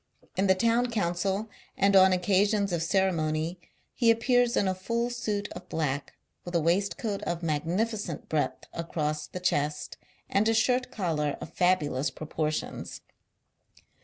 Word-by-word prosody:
In 195 +1 +2
the 190 - +5
Town 230 +5 +2
Council 195 0 -1 0.3
and 200 0 +3
on 190 0 +8
occasions 200 +2 +2
•of 170 -2 0
ceremony, 165 -2 0 0.3
he 235 -3 +3
appears 245 +1 +3
in 200 - +2
a 190 - +1
full 230 +6 -2
suit 210 -4 -2
of 180 +1 -9
black, 145 -3 -2 0.3
with 175 0 -6
a - - +5
waistcoat 200 +5 0
of 170 0 -3
magnificent 170 +4 -1
breadth 155 -2 -1
across 155 -2 -2
the 180 - -6
chest, 150 -4 -1 0.3
and 210 +3 +2
a 225 - +2
shirt 250 +3 +2
collar 160 - -1
of 165 - -9
fabulous 150 -6 +2
proportions. 155 0 -4
185 Hz, 140 wpm, -28 LUFS, 160-215 Hz, 0.3 s, on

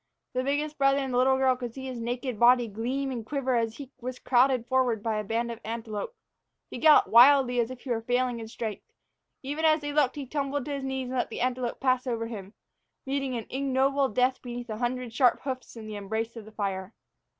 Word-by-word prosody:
The 255 0 0
biggest 295 +2 -1
brother 275 0 +4
and 270 -2 -2
the 245 - +3
little 265 +1 +4
girl 260 -1 +3
could 245 -2 -6
see 265 -1 -7
his 255 -2 -5
naked 245 0 -3
body 240 0 +5
gleam 250 +6 -2
and 240 -3 -4
quiver 265 +1 -1
as 230 -1 -1
he 280 -2 -9
was 250 +1 -5
crowded 250 -1 +3
forward 245 -4 +1
by 220 -2 0
a - - -3
band 230 +3 -1
of 230 - -7
antelope. 225 - -5 0.6
He - - -6
galloped 310 -1 +6
blindly, 250 +1 +7
as 235 0 +1
if 255 -1 -9
he 260 - -6
was 225 -1 -1
failing 245 -1 0
in 225 - -7
strength. 220 -2 -6 0.5
Even 290 +4 -3
as 310 -1 +4
they 290 0 -4
looked 285 -4 +2
he 285 -2 -5
tumbled 280 0 -2
to 295 - -5
his 275 -1 -4
knees 265 -1 -3
and 260 - -3
let - - -1
the - - -5
antelope 250 -1 -1
pass 255 -1 +1
over 230 -2 -1
him, 210 -3 -8 0.5
meeting 270 -2 -2
an 225 - -5
ignoble 270 +1 +1
death 250 +4 +1
beneath 240 -1 -6
a 215 - -4
hundred 245 -1 -2
sharp 250 +1 +4
hoofs 260 -2 -5
and 225 - -8
in - - -8
the 210 - -5
embrace 220 +3 -3
of 225 -3 -8
the 215 - -12
fire. 195 -1 -4
250 Hz, 230 wpm, -28 LUFS, 230-270 Hz, 0.6 s, blindly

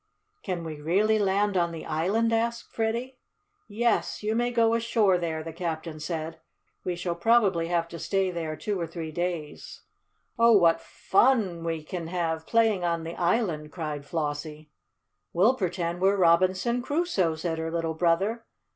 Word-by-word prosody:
"Can 180 -4 -3
we 155 -2 -7
really 205 +7 +2
land 200 0 +1
on 170 -2 +2
the 165 -1 -7
island?" 195 +9 +1
asked 235 +1 -1
Freddie. 235 +3 -2 0.5
"Yes, 230 0 0
you 215 +1 0
may 240 +2 +1
go 230 -1 +3
ashore 225 -5 +2
there," 160 -2 -3
the 165 0 -7
captain 165 -2 -4
said. 160 +1 -4 0.4
"We 180 - -2
shall 175 0 -2
probably 190 -3 +3
have 170 -1 0
to 170 - -8
stay 195 +1 0
there 165 -3 -4
two 205 +2 -3
or 170 - -2
three 160 -1 -6
days." 175 -2 -4 0.6
"Oh, 230 0 +6
what 170 -5 +5
fun 195 -7 +1
we 165 -2 -3
can 170 +1 -5
have, 165 -2 -2
playing 225 -5 +2
on 170 -1 0
the 165 +1 -5
island!" 175 -5 0
cried 150 -4 -4
Flossie. 150 0 -4 0.6
"We'll 200 +9 +4
pretend 175 -6 -2
we're 195 +1 +3
Robinson 185 +7 +3
Crusoe," 270 - 0
said 160 0 -3
her 160 0 -2
little 165 -1 -2
brother. 180 +8 +1
175 Hz, 160 wpm, -27 LUFS, 165-215 Hz, 0.6 s, Oh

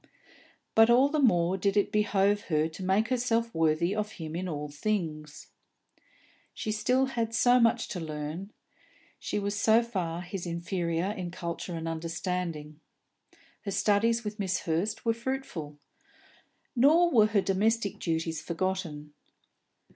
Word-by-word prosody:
But 225 +1 +6
all 255 +4 +5
the 305 +1 0
more 185 -7 +3
did 200 +2 +1
it 205 - +2
behove 205 -1 +2
her 155 -2 +1
to 165 +4 -9
make 195 +4 +2
herself 235 -2 0
worthy 165 +4 +1
of 210 0 -3
him 160 -1 -7
in 185 +1 -3
all 150 -2 -4
things. 155 -2 -4 1.1
She 215 - -3
had - - -1
still 255 +4 +2 0.2
so 245 +2 +4
much 230 0 +3
to 180 - -4
learn; 155 +4 -5 0.7
she - - -3
was 200 0 -2
so 220 +3 +4
far 180 -7 -3
his 185 0 -6
inferior 170 +1 -2
in 185 -5 -5
culture 170 0 -5
and 165 0 -4
understanding. 165 -1 -4 0.8
Her 205 - -4
studies 225 +4 +2
with 210 0 -5
Miss 185 -3 -1
Hurst 170 +9 -2
were 230 - +3
fruitful. 230 - -5 1.0
Nor 320 +8 +5
were 215 -4 +5
her 210 -2 +2
domestic 205 +2 0
duties 160 -1 -2
forgotten. 165 -3 -3
190 Hz, 140 wpm, -29 LUFS, 165-220 Hz, 1.1 s, But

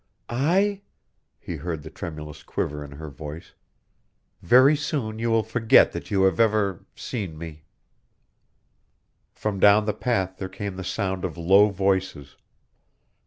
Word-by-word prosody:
"I?" 190 +11 +1 0.6
He 85 - -6
heard 80 0 -5
the - - -10
tremulous 75 -3 -8
quiver 75 0 -4
in 70 -1 -10
her 75 +1 -9
voice. 75 +4 -9 0.9
"Very 130 +5 +6
soon 140 -7 -3
you 115 +1 -1
will 115 -1 +2
forget 110 0 +4
that - - -7
you 95 -2 +2
have 95 -3 +2
ever 105 -5 +1
seen 95 -10 -5
me." 80 -2 -9 1.7
From 105 -2 -3
down 105 +2 +6
the 105 - 0
path 95 -4 -1
there 95 - -5
came 100 0 -6
the 95 - -6
sound 95 -1 -3
of 85 -3 -4
low 95 +5 +5
voices. 95 -7 -1
95 Hz, 140 wpm, -24 LUFS, 85-110 Hz, 1.7 s, Very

